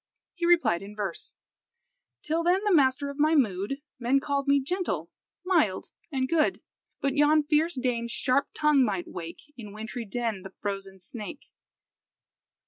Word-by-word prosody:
He 350 -1 -1
replied 340 - +4
in 200 +1 -9
verse 200 -5 -5 0.9
"Till 320 +2 0
then, 360 +4 +2
the 415 -2 +3
master 280 -1 +3
of 280 - -12
my 310 +2 +4
mood, 230 +1 0 0.2
Men 255 +3 +3
called 280 0 -1
me 280 0 +5
gentle, 265 - -2 0.3
mild, 315 - +1 0.2
and 260 -2 0
good; 315 +1 +2 0.4
But 275 -1 +1
yon 295 +1 +5
fierce 305 +3 +2
dame's 240 -2 -1
sharp 260 +3 +1
tongue 300 -3 +4
might 195 -6 -1
wake 170 -1 -7 0.2
In 210 -4 -9
wintry 220 +2 -6
den 225 -1 -2
the 195 - -9
frozen 195 -1 -6
snake." 215 +8 -7
260 Hz, 150 wpm, -27 LUFS, 205-300 Hz, 0.9 s, me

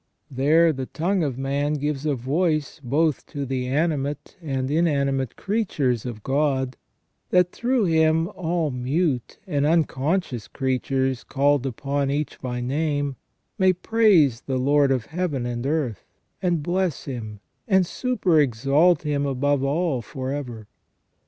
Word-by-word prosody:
There 155 +5 +4
the 130 -2 -5
tongue 185 +4 0
of 140 -6 -1
man 140 +2 -1
gives 150 0 -2
a 145 - +1
voice 155 +3 -1
both 150 +4 +1
to 145 -3 -4
the 130 -1 -2
animate 145 0 -1
and 135 -4 -2
inanimate 140 -5 +1
creatures 150 - -1
of 110 -4 -7
God, 135 -2 0 0.5
that 180 -1 +3
through 245 -2 +1
him 160 -1 +3
all 170 -5 -1
mute 130 +1 -1
and 145 -7 0
unconscious 150 - 0
creatures, 130 -1 -1
called 140 0 +1
upon 140 +2 -2
each 145 +2 -3
by 125 -2 -3
name, 145 +1 -1 0.4
may 190 -1 +5
praise 180 - +3
the 135 -1 -2
Lord 140 +1 +3
of 125 -4 0
Heaven 160 -7 -2
and 120 +1 -3
earth, 140 -8 -1 0.4
and 175 -5 0
bless 175 -1 -1
Him, 110 -6 -6 0.3
and 190 -4 +4
superexalt 155 - +2
Him 145 -2 0
above 140 +1 +1
all 145 -1 0
for 130 +3 -5
ever. 120 -7 -5
145 Hz, 135 wpm, -24 LUFS, 130-165 Hz, 0.5 s, may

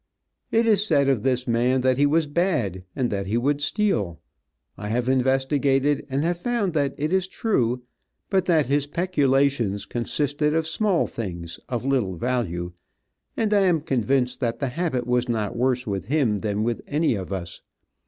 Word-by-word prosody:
It 230 +1 +3
is 210 -3 +4
said 145 -9 +2
of 130 -6 +2
this 130 +1 0
man 125 +2 +2
that 130 0 +2
he 145 - +5
was 160 +2 +2
bad, 145 - -1
that 105 -7 -1
he 110 +4 0
would 145 +4 0
steal. 145 - 0 0.6
I 105 - -6
have 120 +3 -1
investigated, 135 +2 +2
and 135 +2 0
have 170 +1 0
found 210 -3 -1
that 145 -3 0
it 150 +4 -1
is 190 -1 +2
true, 125 - 0 0.5
but 190 -2 +2
that 160 -5 +3
his 145 +2 +1
peculations 140 - +1
consisted 145 +5 -1
of 160 -1 +1
small 180 +3 +1
things, 85 -6 -6
of 120 0 -3
little 125 -9 0
value, 90 -6 -2 0.7
and 215 -2 +1
I 205 - +5
am 165 -4 +2
convinced 130 -3 0
that 120 -3 -1
the 140 - -2
habit 140 -4 -2
was 125 0 0
not 110 -4 -1
worse 125 +1 +1
with 100 -4 -3
him 125 -7 +1
than 105 0 -1
with 120 0 -1
any 150 -1 +1
of 95 -3 -5
us. 90 -3 -5
130 Hz, 175 wpm, -24 LUFS, 115-155 Hz, 0.7 s, he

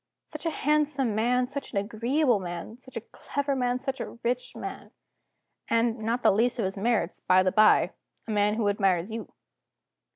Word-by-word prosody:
Such 305 +2 -6
a 325 - -2
handsome 295 -5 +2
man, 245 +4 +2
such 280 +1 -7
an - - -1
agreeable 235 +4 +1
man, 175 +4 -6
such 255 0 -11
a - - -3
clever 280 -1 -2
man, 250 -1 0
such 270 0 -4
a - - -6
rich 250 +1 -2
man - - -7 0.8
and, 230 0 +1
not 230 +3 -1
the - - +6
least 235 +5 +1
of 225 - 0
his 190 - -2
merits, 205 -4 0
by 185 0 +4
the 185 - +2
by, 215 +1 +5 0.4
a - - -3
man 210 0 +2
who 220 -2 0
admires 195 -2 +1
You. 225 -1 -6
230 Hz, 185 wpm, -27 LUFS, 205-255 Hz, 0.8 s, the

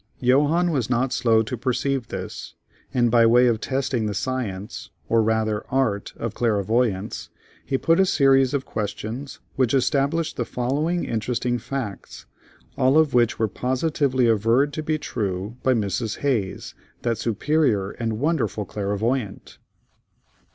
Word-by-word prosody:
Johannes 150 +7 +3
was 125 -6 -1
not 125 +1 +1
slow 115 -3 +3
to 110 +3 -4
perceive 130 +1 -1
this, - - -7 0.4
and 120 -2 +2
by 120 -1 +5
way 120 +2 +5
of 115 -3 +1
testing 130 -4 -1
the 105 - -3
science, 105 -5 -4 0.2
or 115 0 +3
rather, 110 -1 0
art 125 -7 0
of 115 -2 -4
clairvoyance, 110 -2 0 0.3
he 135 - -1
put 165 +6 +2
a 190 - +5
series 135 -3 +4
of 135 - -2
questions 110 +6 -5 0.2
which 130 -1 +2
established 140 +5 +1
the 120 - 0
following 145 +9 -1
interesting 120 +2 -1
facts, 120 -5 -6 0.5
all 130 +2 +4
of 155 -2 +3
which 120 -2 +3
were 110 - +1
positively 130 +2 0
averred 115 +6 +2
to 155 - -3
be 155 0 -1
true 105 -4 -4
by 130 -1 +2
Mrs. 105 +1 -2
Hayes, 120 -9 -1 0.3
"that 115 -2 0
superior 115 -4 +1
and 115 -2 -3
wonderful 140 -6 -1
clairvoyant." 105 +3 -3
120 Hz, 140 wpm, -23 LUFS, 110-135 Hz, 0.5 s, by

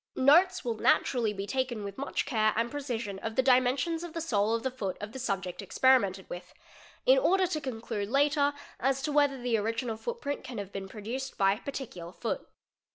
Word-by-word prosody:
Notes 315 +8 +5
wil 230 -2 -1
naturally 230 0 +2
be 195 -1 -4
taken 245 -1 -2
with 200 -1 -6
much 280 - -1
care 215 -4 +2
and 230 +2 0
precision 235 -9 -4
of 220 +2 -4
the 260 - +3
dimensions 260 +6 +3
of 345 -2 -7
the 330 - -3
sole 225 -8 +1
of 230 - -3
the 260 - -1
foot 200 -7 -4
of 210 +1 -6
the 265 - -7
subject 195 -6 -3
experimented 200 -3 +3
with, 175 - -8 0.5
in - - +6
order 385 -5 +3
to 320 -4 -2
con 260 -5 -4
clude 210 -3 -3
later 285 +2 +3 0.2
as 270 +1 +1
to 300 - -1
whether 285 -2 +3
the 240 -2 +1
original 225 +2 -2
footprint 285 - -4
can 250 -2 -7
have 200 -1 -5
been 195 -1 -6
producer 240 +6 -5
by 195 0 +4
a 210 - -7
particular 200 -12 -6
foot. - - -4
245 Hz, 205 wpm, -30 LUFS, 210-280 Hz, 0.5 s, in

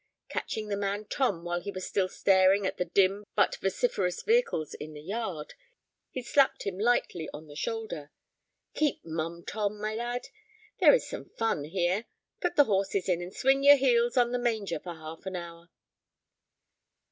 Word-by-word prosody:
Catching 215 -1 -3
the 200 - 0
man 200 +1 -2
Tom 205 -8 0
while 175 0 -1
he 200 - -6
was 185 -2 -5
still 190 -2 0
staring 190 +1 +4
at - - -2
the 180 - 0
dim 195 +2 +2
but - - +3
vociferous 190 -2 -1
vehicles 450 - +1
in 155 +1 -8
the 150 - -9
yard, 190 -5 -4 0.6
he 255 - -5
slapped 275 +3 +3
him 195 -1 -4
lightly 215 -7 +1
on 150 +2 -9
the 145 -1 -13
shoulder. 175 -6 -4 0.6
"Keep 300 -3 0
mum, 165 +1 -4
Tom, 210 -1 -2
my 215 +1 -2
lad. 240 +2 -3 0.5
There - - +8
is - - -2
some - - -7
fun 225 -10 0
here. 180 +6 0 0.3
Put 355 - -1
the 290 - +7
horses 195 -2 0
in, 175 -2 +1
and 175 +1 -6
swing 270 +6 +2
your 285 0 +10
heels 240 -2 +2
on 240 -1 +4
the 245 - 0
manger 220 -8 -1
for 175 0 -7
half 160 +3 -9
an 190 - -4
hour." 170 0 -8
195 Hz, 175 wpm, -29 LUFS, 175-235 Hz, 0.6 s, your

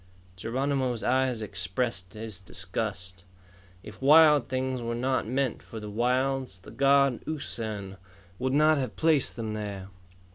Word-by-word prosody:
Geronimo's 130 +3 -1
eyes 130 -2 +1
expressed 95 0 -3
his 110 -2 -5
disgust. 95 -1 -4 0.6
If 105 +2 -11
wild 150 +1 +6
things 130 -1 -2
were 115 0 -3
not 130 0 0
meant 130 0 -1
for 110 - -9
the 105 -1 -7
wilds, 125 0 0
the 90 - -14
god, 140 -2 +3
Usan, 110 -10 -4 0.4
would 130 - 0
not 155 +1 +4
have 125 -7 -3
placed 155 +2 +3
them 110 -2 -4
there. 100 -3 -5
120 Hz, 135 wpm, -28 LUFS, 105-135 Hz, 0.6 s, wild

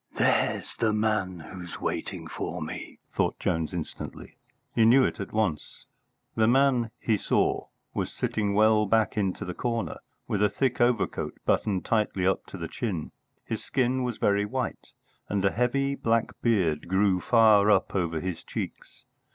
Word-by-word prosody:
"There's - - +1
the 110 -2 +2
man 105 -4 0
who's 90 +1 -8
waiting - - -3
for - - -5
me!" - - -6 0.2
thought - - 0
Jones 80 -2 -1
instantly. 85 -3 -7 0.4
He 115 - +3
knew 125 +4 +6
it - - -1
at 100 - -5
once. 105 -9 -2 0.5
The 110 -1 +3
man, 125 -2 +3
he 110 -2 +1
saw, - - +1 0.3
was - - -2
sitting 100 -2 -1
well 110 0 +4
back 110 +1 +2
into 100 -3 -1
the 90 - -4
corner, 115 +2 -2 0.3
with 105 - -1
a 105 - +4
thick 125 +3 0
overcoat 120 -2 +1
buttoned 95 -4 +1
tightly 105 -4 +1
up 95 - +1
to - - -8
the 85 -2 -4
chin. 90 -5 -4 0.3
His - - -4
skin 130 0 0
was 125 -3 -2
very 100 0 +2
white, 125 +4 -3 0.4
and 100 -1 0
a 100 - +4
heavy 135 +4 +1
black 115 -4 +1
beard 90 -10 +1
grew 95 0 +2
far 110 -2 +5
up 100 -2 +3
over 85 -4 0
his 90 0 -4
cheeks. - - -7
105 Hz, 160 wpm, -27 LUFS, 95-115 Hz, 0.5 s, knew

